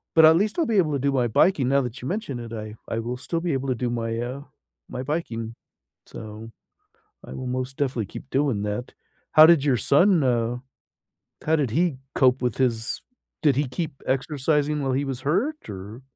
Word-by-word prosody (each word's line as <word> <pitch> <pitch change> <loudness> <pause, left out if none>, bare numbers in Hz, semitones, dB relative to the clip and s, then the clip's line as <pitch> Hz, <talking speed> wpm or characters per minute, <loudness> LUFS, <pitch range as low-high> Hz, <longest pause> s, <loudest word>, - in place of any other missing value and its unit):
but, 160 - +7
at 160 +1 +7
least 210 - 0
I'll 330 - +2
be 225 -4 +1
able 160 -6 +3
to 140 - 0
do 140 +2 +1
my 125 -3 +1
biking, 135 - +3
now 140 +1 +3
that 125 0 -6
you 125 - -5
mentioned 180 - -3
it, 115 -1 -8
I 110 -1 -6
I 115 - -2
will 120 +2 -4
still 165 +6 -3
be 170 -1 -1
able 135 0 -2
to 130 - +1
do 120 +1 -2
my, 115 -1 -2
uh, 125 +3 -4 0.5
my 125 - -5
biking. 115 -7 -3 0.5
So, 110 +1 -9 0.7
I - - -9
will 130 - -6
most 130 +1 -3
definitely 125 -6 -1
keep 130 - -10
doing 135 -7 +1
that. 105 +4 -4 0.4
How 155 0 +9
did 165 -4 +5
your 135 -4 +3
son, 175 +3 +4
uh, 120 -1 +1 0.9
how 160 - +3
did 140 -7 0
he 165 +1 +1 0.2
cope 130 0 +4
with 125 -3 -1
his 120 -3 0 0.4
did 145 -4 +4
he 145 -1 +1
keep 135 +2 -5
exercising 145 +2 0
while 135 -1 0
he 140 +2 0
was 135 -2 -4
hurt? 225 - -1
Or 100 +5 -8
130 Hz, 205 wpm, -24 LUFS, 120-150 Hz, 0.9 s, How